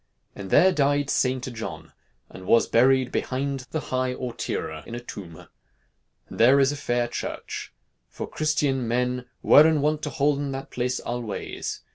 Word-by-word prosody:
And 95 -1 -7
there 190 - +5
dyede 145 -1 +1
Seynte 130 -1 0
Johne, 110 -1 -7 0.4
and 95 0 -12
was 115 - +5
buryed 130 +2 +3
behynde 135 0 -3
the 160 - -2
highe 130 0 0
Awtiere, 95 - -4
in 115 - -6
a - - -4
toumbe. 95 -9 -10 0.8
And - - -10
there 130 +4 +6
is 135 0 +4
a - - -4
faire 120 -4 -1
chirche. 120 - -5 0.4
For - - -6
Christene 145 -5 0
mene 125 +1 -1 0.2
weren 155 +1 +6
wont 150 +1 0
to 150 - -3
holden 145 0 0
that 135 0 -7
place 125 +1 -1
alweyes. 120 -4 -4
130 Hz, 155 wpm, -25 LUFS, 120-140 Hz, 0.8 s, there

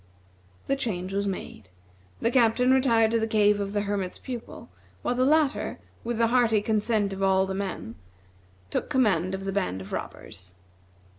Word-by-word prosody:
The 275 - +1
change 195 -8 -3
was 200 0 0
made. 185 - -6 0.5
The 230 - +1
Captain 250 +1 +3
retired 230 -4 +3
to 230 - +2
the 220 - 0
cave 210 -1 +3
of 200 -1 -3
the 205 0 0
Hermit's 200 -3 -3
Pupil, 245 -3 -8 0.4
while - - 0
the 255 +1 +2
latter, 305 -1 +2 0.3
with 235 0 -2
the 230 - +3
hearty 230 -2 +3
consent 210 -2 +1
of 195 - -6
all 190 0 +3
the 190 - -4
men, 190 - -4 0.8
took - - -2
command 190 -8 +2
of 195 0 -7
the 195 - -1
band 95 - -1
of 95 +1 -10
robbers. 90 +1 -8
210 Hz, 170 wpm, -26 LUFS, 190-235 Hz, 0.8 s, Captain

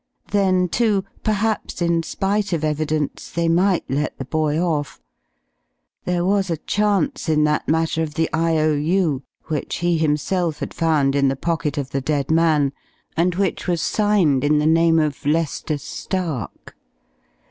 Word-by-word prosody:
Then 185 -3 +2
too, 205 0 +1 0.2
perhaps 215 0 -1
in 170 -1 +1
spite 195 +3 -1
of 160 -2 -1
evidence, 155 -1 -2
they 170 0 -1
might 180 +3 +2
let 145 +3 -2
the 135 - -5
boy 155 +2 0
off. 160 -5 -1 1.1
There 175 -1 0
was 195 0 +1
a 165 - -1
chance 205 -1 0
in 150 -1 +3
that 150 0 0
matter 160 0 +1
of 155 -2 -3
the 165 0 +1
I.O.U., 155 -1 +1 0.2
which 155 -4 -3
he 175 -1 0
himself 160 +2 0
had - - -5
found 150 -4 +1
in 140 -1 +3
the 135 - +1
pocket 150 -1 -2
of 140 -2 -3
the 135 - -1
dead 140 +1 -1
man, 155 -4 +3 0.4
and 175 +2 +1
which 190 -1 -1
was 175 -2 +1
signed 195 -11 +2
in 150 +1 +3
the 150 - +1
name 165 +1 +4
of 150 -3 0
Lester 155 0 0
Stark. 160 - -5
160 Hz, 155 wpm, -21 LUFS, 150-180 Hz, 1.1 s, name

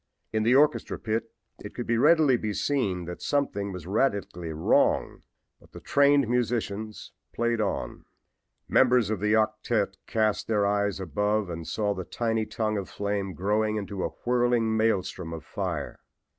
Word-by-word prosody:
In 110 - +1
the 115 +4 +4
orchestra 150 +2 +3
pit 115 0 -3 0.3
it - - -9
could - - -5
readily 135 +3 +5
be 110 -3 -2
seen 100 -11 -1
that 90 +1 -7
something 100 -9 -1
was 90 -4 -7
radically 100 -5 -1
wrong, 80 +1 +1 0.4
but - - -22
the - - -9
trained 140 -2 +3
musicians 110 -3 -2 0.2
played 115 -1 0
on. 95 - -3 0.6
Members 125 -4 +4
of 110 - -1
the 105 +2 +1
octette 110 -2 0
cast 110 -2 0
their 105 -2 +2
eyes 100 -1 0
above 105 +3 -1
and 85 -1 -6
saw 105 -2 0
the 95 - -5
tiny 110 +3 -1
tongue 110 -2 -1
of 95 - -7
flame 100 -2 -3
growing 105 +3 0
into 100 -2 -4
a - - 0 0.2
whirling 120 -2 +2
maelstrom 95 -6 0
of 80 - -8
fire. - - -4
110 Hz, 155 wpm, -27 LUFS, 100-115 Hz, 0.6 s, readily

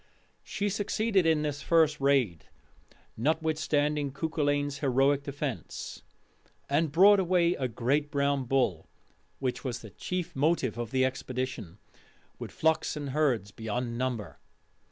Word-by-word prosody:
She 205 - -3
succeeded 205 -2 +1
in 155 -2 +3
this 145 -1 -3
first 155 -3 +3
raid, 130 - +2 0.7
notwithstanding 150 0 0
Cuculainn's 145 -1 -1
heroic 135 0 +2
defence, 140 -2 -5 0.7
and 150 +2 +1
brought 195 +6 +7
away 175 -2 +3
a 130 - -2
great 135 +6 0
brown 140 -2 0
bull 120 -11 0 0.5
which 130 -2 -3
was 125 -4 -4
the 110 - -11
chief 180 - -4
motive 140 -4 +1
of 120 -2 -3
the 130 +1 +2
expedition 130 -7 -4 0.6
with - - -6
flocks 160 0 0
and 145 -2 -4
herds 130 -9 +1
beyond 115 +2 -3
number. 115 - -3
140 Hz, 125 wpm, -29 LUFS, 130-160 Hz, 0.7 s, brought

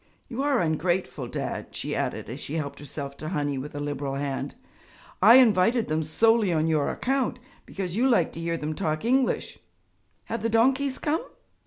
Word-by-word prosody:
You 250 +1 -4
are 280 -3 +2
ungrateful, 165 -4 -1
Dad,' - - -5
she - - -3
added - - -2
as - - -6
she 150 - -5
helped 150 -3 -4
herself 140 0 -6
to 155 - -5
honey 145 -5 -1
with 145 +2 -7
a - - -3
liberal 145 -1 -3
hand, 140 -1 -3 0.7
'I 220 +5 +9
invited 225 -1 +4
them 155 +1 0
solely 220 +6 +3
on 160 -1 +2
your 155 -3 +1
account 265 -1 -1 0.3
because 185 -2 -4
you 255 +5 +3
like 185 -10 +2
to - - -7
hear 165 0 -1
them 155 0 -3
talk 155 -1 -2
English. 260 +2 +1 0.7
Have 230 - -4
the 230 - 0
donkeys 260 +4 +2
come?' 315 +1 -1
175 Hz, 180 wpm, -26 LUFS, 150-235 Hz, 0.7 s, I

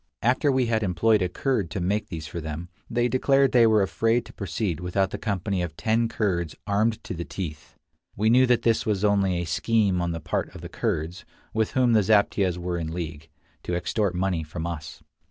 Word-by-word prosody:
After 130 +5 +3
we 130 -1 +2
had 115 -1 +1
employed 105 +3 +2
a 90 - +1
Kurd 110 - -1
to 95 - -4
make 100 +4 0
these 80 -3 -6
for 85 +3 -6
them, 80 +3 -6 0.2
they 120 +1 +1
declared 135 +1 +3
they 120 -2 +6
were 110 -2 +4
afraid 115 +4 +1
to - - -13
proceed 100 -3 -3
without 90 +2 0
the - - -5
company 100 -3 -1
of 85 -2 -4
ten 115 +1 +1
Kurds 90 -8 -1
armed 105 +2 +1
to - - -5
the 85 -1 -4
teeth. 80 -5 -7 0.4
We 105 +2 +1
knew 125 +3 +5
that 125 -1 +3
this 115 -1 +2
was 105 -1 0
only 100 -3 +2
a 85 - -2
scheme 100 0 +1
on 85 - -1
the 85 - -3
part 80 0 -3
of - - -9
the - - -7
Kurds, 85 +4 -2 0.3
with 110 -1 0
whom 125 -2 +3
the 110 - +5
zaptiehs 100 -3 +2
were 90 0 -3
in 80 -1 -4
league, 80 -2 -6 0.3
to 90 - -3
extort 90 +2 -1
money 90 -2 0
from 80 +1 -6
us. 85 -3 -6
95 Hz, 210 wpm, -25 LUFS, 85-110 Hz, 0.4 s, they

